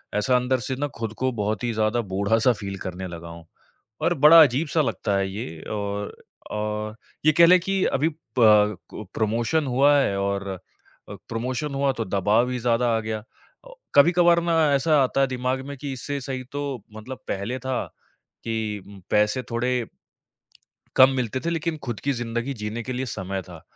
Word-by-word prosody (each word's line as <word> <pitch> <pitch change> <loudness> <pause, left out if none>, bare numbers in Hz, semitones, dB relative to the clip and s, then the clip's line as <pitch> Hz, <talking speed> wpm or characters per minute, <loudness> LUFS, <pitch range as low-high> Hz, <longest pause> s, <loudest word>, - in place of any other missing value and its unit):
ऐसा 125 +5 +2
अंदर 125 +1 +1
से 130 +2 -3
ना, 145 +3 -2
खुद 115 -4 -6
को 130 0 0
बहुत 105 -2 -2
ही 120 - 0
ज़्यादा 110 +2 +1
बूढ़ा-सा 105 +4 +2
फ़ील 100 -2 -6
करने 95 0 -5
लगा 85 -1 -8
हूँ। 85 0 -11 0.6
और - - +2
बड़ा 155 +3 +9
अजीब-सा 150 +3 +1
लगता 105 -7 -1
है 95 0 0
ये 80 -6 -6
और 100 -1 -3 0.4
औ 105 0 -3 0.3
ये 155 - +7
कहलें 170 +2 +7
कि 195 +1 0
अभी 150 +4 +1 0.3
प 105 -3 +5
कु 110 - -8
प्रमोशन 115 +8 0
हुआ 135 +3 +4
है 100 -8 +1
और 100 0 -2 0.6
अ, - - -6 0.2
प्रमोशन 125 +5 -3
हुआ, 140 0 +2
तो 115 -3 -3
दबाव 105 +6 +2
ही 125 - -2
ज़्यादा 120 0 +1
आ - - 0
गया। 110 0 -3
अ, 115 - -22 0.3
कभी-कभार 170 +3 +5
ना, 165 -3 +3
ऐसा 150 +3 +3
आता 135 +1 0
है 135 - +3
दिमाग 130 +1 -2
में 140 - -7
कि 140 +1 -5
इससे 140 +2 -4
सही 130 -1 -4
तो 140 -5 -4 0.2
मतलब 125 +4 -8
पहले 100 +6 -3
था 130 -1 -2 0.6
कि 110 -3 -3
उम, 100 -1 -12
पैसे 105 +5 +2
थोड़े 120 0 -1 1.1
कम 130 +1 +8
मिलते 125 0 -2
थे, 170 - -2
लेकिन 165 -1 -2
खुद 120 -5 -4
की 140 - +2
ज़िंदगी 120 +1 -3
जीने 105 +1 -5
के 130 - -5
लिए 130 +1 -2
समय 95 -3 -4
था। 85 -4 -12
120 Hz, 180 wpm, -24 LUFS, 105-135 Hz, 1.1 s, बड़ा